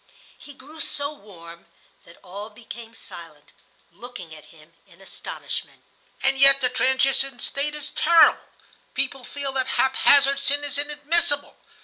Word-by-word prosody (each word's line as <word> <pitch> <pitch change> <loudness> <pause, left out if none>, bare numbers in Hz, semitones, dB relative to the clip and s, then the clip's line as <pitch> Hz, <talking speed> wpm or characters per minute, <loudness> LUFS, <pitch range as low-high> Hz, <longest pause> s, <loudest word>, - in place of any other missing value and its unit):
He 285 - -14
grew 300 +5 -16
so 285 0 -4
warm 170 - -15 0.4
that 170 - -18
all 200 +4 -9
became 230 +1 -13
silent, 165 -8 -12 0.4
looking 185 -4 -11
at 155 - -14
him 160 0 -21
in 170 - -22
astonishment. 195 - -8 0.4
"And 270 0 +1
yet 275 0 +7
the 255 -2 0
transition 265 +1 +1
state 285 +4 -2
is 300 0 -1
terrible. 335 -1 +4 0.5
People 270 -1 -3
feel 280 +2 -6
that 260 -1 -2
haphazard 275 +1 +3
sin 285 +1 +1
is 285 -1 0
inadmissible. 295 0 +3
270 Hz, 135 wpm, -22 LUFS, 205-285 Hz, 0.5 s, yet